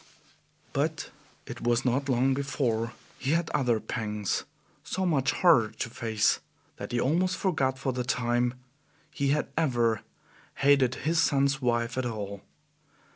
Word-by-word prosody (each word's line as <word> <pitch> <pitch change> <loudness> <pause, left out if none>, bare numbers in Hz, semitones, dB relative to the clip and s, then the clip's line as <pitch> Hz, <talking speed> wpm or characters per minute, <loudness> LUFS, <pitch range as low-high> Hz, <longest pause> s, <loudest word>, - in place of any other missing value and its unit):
But - - -1 0.3
it - - -8
was 120 +2 +1
not 135 +3 +1
long 130 +1 +3
before 125 -4 -1 0.3
he 135 +3 0
had 170 0 0
other 125 -6 +2
pangs, 105 -3 -2 0.4
so 190 0 -2
much 145 -5 +2
harder 150 -12 +4
to 110 - -4
face 110 -3 +1 0.4
that - - -7
he 120 - 0
almost 180 +8 +1
forgot, 135 -8 0
for 135 -1 -2
the 125 0 -2
time, 120 0 0 0.6
he 140 -2 -1
had 150 +2 +1
ever 120 -8 +1 0.5
hated 135 -2 +4
his 165 +1 +2
son's 140 -3 +2
wife 120 0 0
at 125 - -1
all. 100 -3 -5
130 Hz, 140 wpm, -28 LUFS, 120-140 Hz, 0.6 s, harder